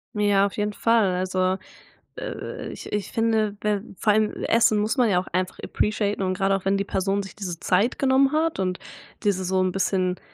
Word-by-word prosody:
Ja, 205 -1 +3
auf 200 - -4
jeden 210 0 -1
Fall. 220 -5 +2
Also, 185 0 0 0.6
äh, - - -6
ich - - -9
ich 210 -1 -3
finde 220 -2 +1
wer 210 -2 0 0.2
vor 210 - +3
allem 215 0 +2
essen 225 -2 +4
muss 215 +6 0
man 245 -4 +4
ja 180 - +3
auch 185 - -6
einfach 185 +1 -2
appreciaten 210 -1 -1
und 185 0 0
grade 195 0 +2
auch 195 -1 -5
wenn 195 +1 +2
die 195 - 0
Person 195 +1 -1
sich 195 - -11
diese 180 -5 -5
Zeit 205 +8 +1
genommen 270 0 +3
hat 315 -5 0
und 185 -1 -1 0.4
diese 195 -3 +1
so 185 +1 +1
'n 185 -1 +1
bisschen 185 -1 0
200 Hz, 205 wpm, -24 LUFS, 185-215 Hz, 0.6 s, essen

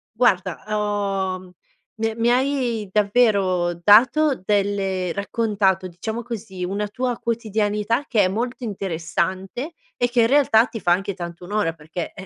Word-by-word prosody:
Guarda, 190 -7 +1
uhm, 215 - -1 0.7
ho 180 - -19 0.5
mi 225 - +1
è 225 - -3
mi 230 +1 +2
hai 250 -5 0
davvero 200 -4 +2
dato 240 - +4
delle 195 -3 0
raccontato, 200 -2 0
diciamo 220 +7 -5
così, 215 -5 -6
una 200 +3 -2
tua 245 +3 -2
quotidianità 220 +1 -1
che 220 -5 +2
è - - +3
molto 240 +6 -3
interessante, 190 - -3 0.2
e 245 - +1
che 240 0 +3
in 225 - +4
realtà 250 -4 +5
ti 225 - -7
fa 175 - +1
anche 195 +2 -2
tanto 175 -1 -8
onore 195 -3 -1
perché, 160 +2 -6
ehm, 185 - -9
210 Hz, 150 wpm, -22 LUFS, 185-235 Hz, 0.7 s, realtà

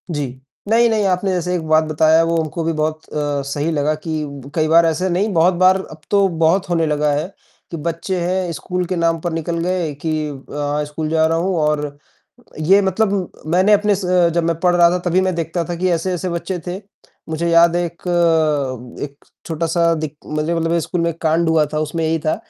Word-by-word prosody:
जी। 150 -4 -2 0.4
नहीं, 235 +1 +4
नहीं 215 -2 +1
आपने 190 +1 0
जैसे 180 0 -1
एक 160 -3 -4
बात 155 0 +4
बताया 155 +1 +3
वो 165 0 0
हमको 160 +2 -4
भी 165 +1 0
बहुत 155 0 -2
अ, 145 -1 -1
सही 150 +3 -1
लगा 150 0 +1
कि 155 0 -4 0.3
कई 155 -1 +2
बार 165 +1 +5
ऐसे 165 +3 0
नहीं 190 +5 0
बहुत 170 +2 +4
बार 185 +1 +6
अब 155 0 -12
तो 200 -1 +4 0.2
बहुत 175 +3 +2
होने 165 -2 +1
लगा 150 0 +1
है 150 +4 -1 0.4
कि 165 - -4
बच्चे 170 +4 -3
हैं 180 0 -1
स्कूल 180 +3 -3
के 185 +2 -3
नाम 165 -1 +1
पर 175 -1 -3
निकल 165 +1 -2
गए 175 -4 -1
कि 155 -1 -1
अ, 145 +1 -3
स्कूल 155 +1 -4
जा 160 0 +3
रहा 165 +1 0
हूँ 185 +2 0
और 150 -1 -1 0.6
ये 190 +6 +4
मतलब 195 -1 0 0.2
मैंने 185 +6 +4
अपने 205 0 +3
से 180 -2 +2
जब 170 0 0
मैं 165 0 0
पढ़ 180 0 +2
रहा 170 -1 +6
था 180 - 0
तभी 180 +2 +3
मैं 185 0 0
देखता 170 +1 -2
था 175 - -4
कि 185 +2 0
ऐसे-ऐसे 180 +2 -1
बच्चे 170 +2 -3
थे। 180 +1 -3 0.5
मुझे 165 +2 -1
याद 170 0 +5
है। 175 - +1
एक, 170 0 -9 1.0
एक 140 -1 -9 0.2
छोटा-सा 165 +1 +1
दिक 155 -2 -5
मतलब 165 +2 0
स्कूल 170 +2 -2
में 170 - +1
एक 165 - -15
कांड 165 +1 +2
हुआ 160 -2 +3
था 155 - 0
उसमें 155 +2 -2
यही 160 +1 0
था 155 +1 0
165 Hz, 210 wpm, -19 LUFS, 155-180 Hz, 1.0 s, बार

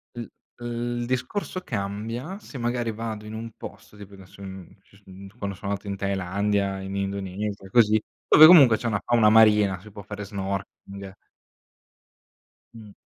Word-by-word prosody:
L 120 - -5 0.4
uhm, 120 0 -4
il 120 - -3
discorso 130 - -3
cambia 115 - -5
se 155 - -11
magari 120 -1 -2
vado 110 -1 -6
in 105 - -8
un 115 +1 -6
posto 105 - -11
tipo 100 -1 -12
adesso, 95 0 -15
uhm, 95 -1 -10
ci - - -26
s - - -25
uhm, 95 +1 -12
quando 100 -3 -4
so 100 - -13
andato 100 +1 -3
in 100 - -4
Thailandia, 100 +1 -1
in 95 0 -6
Indonesia, 100 0 -4
così, 110 0 +4 0.3
dove 155 - +9
comunque 140 -11 +8
c'è 120 - -4
una 105 -4 -1
fauna 115 -3 +4
marina, 105 -4 +5
si 105 - -14
può 100 - -10
fare 100 +1 -7
snorkeling. 100 0 -6 1.6
Mh. 110 -2 -12
105 Hz, 165 wpm, -25 LUFS, 100-115 Hz, 1.6 s, dove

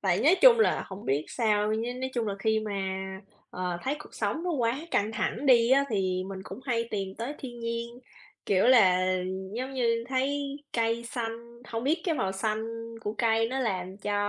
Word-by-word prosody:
Tại - - +2
nói - - +6
chung - - +9
là - - +2
hổng 195 +1 -8
biết 140 +3 0
sao, 215 -3 +1
nh 240 +3 -2
nói 260 0 -2
chung 235 -2 0
là 200 - -1
khi 220 +2 +1
mà, 215 -1 -4 0.8
ờ, 180 -1 -3
thấy 275 +3 -1
cuộc 300 - -13
sống 325 - -1
nó 360 - 0
quá 250 -3 0
căng 210 +2 +1
thẳng 245 +4 -2
đi 240 -2 +6
á, 275 +1 +5
thì 185 -3 0
mình 190 -1 -6
cũng 255 - -9
hay 235 -3 0
tìm 195 -2 -3
tới 240 +6 -3
thiên 240 -3 -8
nhiên, 230 0 -2 0.6
kiểu 195 -2 +3
là, 185 -7 +5 0.4
giống 260 +3 -3
như, 230 -2 +1
thấy 275 +2 -1 0.2
cây 230 0 0
xanh 235 0 -6
hông 230 +1 -3
biết 315 +5 +2
cái 335 - +1
màu 195 -9 -1
xanh 215 +3 -1 0.4
của 210 -1 -3
cây 225 -1 +2
nó 260 +2 -2
làm 190 -5 -2
cho 205 +1 -3
230 Hz, 200 wpm, -28 LUFS, 205-255 Hz, 0.8 s, chung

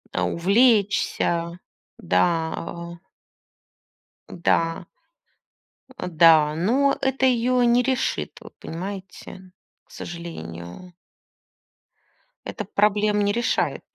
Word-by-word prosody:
А - - 0
увлечься. 195 -4 +1 0.4
Да, 175 - +1 0.3
а. 170 0 -7 1.3
Да. 165 -1 0 1.1
А, - - -5
да, 160 -3 +5
но 250 - +2
это 265 0 +1
её 250 0 +2
не 240 +1 +3
решит, 260 0 -2
вот - - -14
понимаете, 185 +1 -8 0.3
к - - -27
сожалению. 165 - -9 1.5
Это 210 - -5
проблем 210 +1 +1
не 205 0 +2
решает. 235 +3 -1
190 Hz, 85 wpm, -23 LUFS, 170-235 Hz, 1.5 s, да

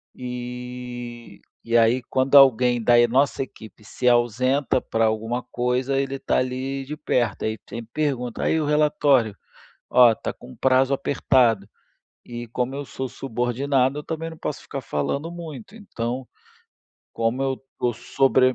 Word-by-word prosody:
E 125 -2 -7 0.2
e 115 0 -1
aí 115 +2 +4
quando 130 +1 +1
alguém 125 -3 +6
da 120 +1 +5
e 120 - +6
nossa 135 +3 +2
equipe 110 -5 -13
se 125 +3 -3
ausenta 125 +3 +2
pra 115 0 0
alguma 115 +3 -1
coisa, 125 +2 -1
ele 135 0 -2
tá - - 0
ali 130 +2 -2
de 150 +3 -5
perto. 120 -7 0
Aí 110 - 0
e - - -19
sempre 115 -1 -8
pergunta: 130 -6 -2
“Aí, 160 - +2
o - - -1
relatório?", 145 -7 +3 0.6
"Ó, 120 -2 +7
tá - - -5
com 65 - -14
um - - -13
prazo 130 +1 +3
apertado”. 125 -6 +2 0.6
E 120 0 -7
como 125 +3 -2
eu 145 +1 -4
sou 130 -1 -5
subordinado, 130 +3 0
eu - - -5
também 165 0 -4
não 160 - -10
posso 150 - -4
ficar 135 - -6
falando 115 - -2
muito. 165 - -9
Então, 125 - -5 0.8
como 115 +3 -1
eu 135 -1 0 0.2
tô 120 - +1
sobre 130 +2 +2
125 Hz, 160 wpm, -23 LUFS, 120-135 Hz, 0.8 s, Ó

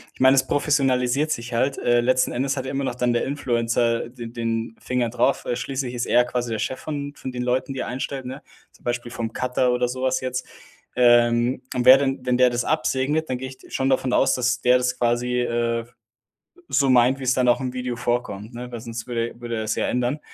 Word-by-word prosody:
Ich - - -21
meine, 130 +1 +6
es 135 - +2
professionalisiert 135 -1 +1
sich 120 -4 -3
halt. 130 +4 +1
Äh, 120 0 +2
letzten 130 +1 +2
Endes 135 +2 -1
hat 130 - -3
ja - - -4
immer 140 0 -2
noch 125 - -3
dann 125 -1 +1
der 120 - +1
Influencer, 115 -4 0
äh, - - -11
de 120 -1 -8
den 115 -1 -3
Finger 125 -2 -1
drauf, 125 +3 +1
äh, 120 - -1
schließlich 130 0 -3
ist 120 -1 -3
er 125 - +4
quasi 125 -1 -3
der 110 - -1
Chef 130 +4 -3
von 145 -2 -5
von 130 - -6
den 125 0 -4
Leuten, 125 +2 -1
die 135 - -4
er - - -4
einstellt, 130 +1 -4
ne? 130 +3 -7 0.3
Zum - - -24
Beispiel 120 0 -3
vom 115 -2 -4
Cutter 125 0 0
oder 125 0 +1
so 130 +1 -5
was 130 0 +1
jetzt. 130 0 -3 0.5
Ähm, 120 0 +4
und 125 -1 0
wer 130 +1 +9
denn 135 -2 -2
wenn 125 -1 +2
der 125 0 +6
das 120 0 -2
absegnet, 135 +5 0
dann 130 - -1
gehe 130 +1 -6
ich 130 0 -13
schon 135 0 0
davon 130 -1 +1
aus, 135 - +3
dass 125 0 0
der 125 0 +5
das 125 0 -1
quasi, 125 +1 +1
äh, 115 -1 -1 0.8
so 140 -1 +2
meint, 130 +1 +4
wie's 130 -1 +1
dann 125 -1 +2
auch 120 - +3
im 130 -1 -4
Video 125 -1 -3
vorkommt, 120 -2 -3
ne, 125 +1 -7
weil 120 - -5
sonst 115 0 -7
würde 120 -1 -3
würde 120 -1 -4
er 110 - -2
es 110 - -1
ja - - -1
ändern. 125 +4 0
125 Hz, 235 wpm, -23 LUFS, 120-130 Hz, 0.8 s, wer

